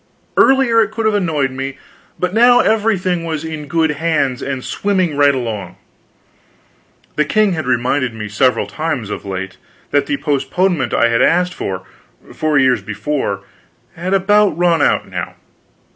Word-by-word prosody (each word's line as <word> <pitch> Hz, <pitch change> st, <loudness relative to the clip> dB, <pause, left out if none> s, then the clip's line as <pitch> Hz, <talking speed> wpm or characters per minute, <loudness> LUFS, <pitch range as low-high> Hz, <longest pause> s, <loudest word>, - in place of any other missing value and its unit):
Earlier 265 Hz, -4 st, +4 dB
it 215 Hz, -, +1 dB
could 220 Hz, +1 st, -4 dB
have 220 Hz, -, +3 dB
annoyed 160 Hz, -9 st, 0 dB
me, 135 Hz, +1 st, -5 dB, 0.4 s
but 180 Hz, 0 st, -1 dB
now 245 Hz, +2 st, +6 dB
everything 205 Hz, -7 st, +1 dB
was 160 Hz, -2 st, -3 dB
in 155 Hz, -2 st, -6 dB
good 160 Hz, +1 st, +1 dB
hands 150 Hz, -4 st, -1 dB
and 135 Hz, -2 st, -4 dB
swimming 185 Hz, -6 st, 0 dB
right 145 Hz, -1 st, +4 dB
along. 115 Hz, -5 st, -4 dB, 1.4 s
The 150 Hz, -, +4 dB
king 210 Hz, +5 st, +2 dB
had 160 Hz, -5 st, -4 dB
reminded 125 Hz, 0 st, 0 dB
me 105 Hz, -1 st, -5 dB
several 125 Hz, +5 st, +1 dB
times, 150 Hz, -10 st, -3 dB
of -, -, -6 dB
late, 95 Hz, -1 st, -5 dB, 0.3 s
that 145 Hz, 0 st, +1 dB
the 280 Hz, -, -1 dB
postponement 145 Hz, -, 0 dB
I 120 Hz, -, +3 dB
had 115 Hz, 0 st, +2 dB
asked 180 Hz, +1 st, +2 dB
for, 95 Hz, -, -5 dB, 0.5 s
four 155 Hz, -2 st, 0 dB
years 130 Hz, -5 st, +3 dB
before, 105 Hz, +2 st, -3 dB, 0.5 s
had 180 Hz, +4 st, -1 dB
about 205 Hz, -1 st, +3 dB
run 170 Hz, -3 st, +2 dB
out -, -, +2 dB
now. -, -, -5 dB
155 Hz, 155 wpm, -17 LUFS, 130-185 Hz, 1.4 s, now